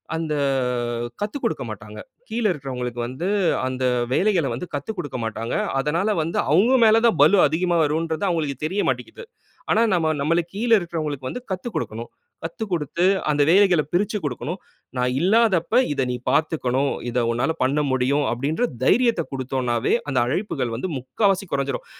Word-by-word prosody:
அந்த 160 -2 -2 0.9
கத்துக்கொடுக்க 210 +7 -2
மாட்டாங்க, - - -9 0.3
கீழே 230 -2 0
இருக்கிறவங்களுக்கு. 125 -5 -5
வந்து 130 +9 -4 0.4
அந்த 130 0 -2 0.3
வேலைகளை 185 -4 +2
வந்து 120 - -5
கத்துக்கொடுக்க 145 -1 -4
மாட்டாங்க. 115 +1 -4 0.3
அதனால 170 +9 0
வந்து, 165 +2 -3
அவங்க 210 - +4
மேல 220 +1 +6
தான் 230 - +1
பலு 200 - +5
அதிகமா 170 +3 0
வருங்கறது 160 +5 -1
அவங்களுக்கு 155 -6 -1
தெரியமாட்டேன்ங்க்கிது. 205 - -2 0.5
ஆனா 220 - +4
நாம 160 -3 +2
நமக்கு 165 +4 +1
கீழ 235 +4 -2
இருக்கிறவர்களுக்கு 155 -6 -4
வந்து - - -5
கத்துக் 190 +5 -4
கொடுக்கணும். 115 +2 -4 0.3
கத்துக்கொடுத்து 170 -2 -2 0.2
அந்த 145 -1 +2
வேலைகளை 180 -3 +5
பிரிச்சுக் 205 +1 0
குடுக்கணும். 150 +6 -4 0.4
நான் 125 0 +1
இல்லாதப்போ, 210 +1 +3 0.2
இத 140 - -1
நீ - - -2 0.2
பார்த்துக்கணும். 140 -4 +1 0.2
இத 120 +1 0
உன்னால 120 +7 0
பண்ண 135 +3 +1
முடியும். 130 +3 +1
அப்படின்ற 140 - -1 0.2
தைரியத்த 235 -7 +3
கொடுத்தோம்ன்னாவே 130 -3 -1 0.2
அந்த 135 - +1
அழைப்புகள் 130 - -2
வந்து 125 - -3
முக்கால்வாசி 195 - 0
கொறஞ்சிடும். 140 -1 -2
160 Hz, 140 wpm, -23 LUFS, 130-190 Hz, 0.9 s, மேல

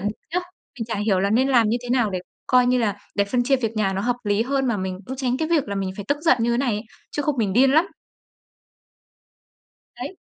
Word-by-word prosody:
bực 205 +3 -3 0.2
nhá. - - +3 0.4
Mình 225 - -2
chả 230 - -3
hiểu 200 -2 +1
là 200 - +1
nên 255 +5 +3
làm 240 -5 +4
như 225 - +2
thế 245 - -7
nào 245 -5 +2
để 185 - -2 0.3
coi 250 -1 +4
như 250 0 +3
là 205 -4 0 0.2
để 200 - +2
phân 245 +4 0
chia 270 +2 +3
việc 225 -4 -2
nhà 195 -3 +1
nó 190 - -2
hợp 245 +3 0
lý 205 +2 +2
hơn, 270 +1 0
mà 235 - +1
mình 185 -1 -4
cũng 260 - -5
tránh 255 -2 0
cái 315 +3 -2
việc 320 -8 +1
là 200 - -2
mình 195 -1 -2
phải 205 - -6
tức 285 - +1
giận 335 +1 +4
như 235 +1 +2
này 255 -2 +1
ấy, 210 - -3 0.3
chứ 295 - -2
không 290 -1 0
mình 200 -4 +1
điên 260 +4 +5
lắm. 320 +5 +4 2.1
Đấy. 380 - -6
235 Hz, 255 wpm, -23 LUFS, 205-265 Hz, 2.1 s, điên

